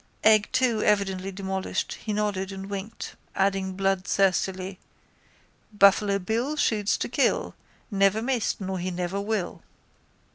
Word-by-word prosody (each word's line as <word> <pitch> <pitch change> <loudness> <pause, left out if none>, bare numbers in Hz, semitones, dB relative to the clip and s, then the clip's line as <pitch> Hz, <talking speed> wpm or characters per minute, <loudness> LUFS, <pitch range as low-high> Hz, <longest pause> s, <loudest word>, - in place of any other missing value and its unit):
Egg 215 -1 +5
two 245 -4 +2
evidently 195 -2 +1
demolished, 190 0 -3
he 215 - -6
nodded 205 -2 -1
and 195 +1 -7
winked, 200 +3 -6 0.2
adding 195 -1 +1
bloodthirstily: 190 -1 0 1.0
_—Buffalo 200 0 +5
Bill 230 +10 -1
shoots 215 -8 +1
to - - -2
kill, - - +1 0.4
Never 195 +2 +3
missed 245 -3 0
nor 190 -1 -3
he 180 +1 -2
never 180 +2 -2
will. 205 -3 -2
195 Hz, 120 wpm, -26 LUFS, 190-210 Hz, 1.0 s, Egg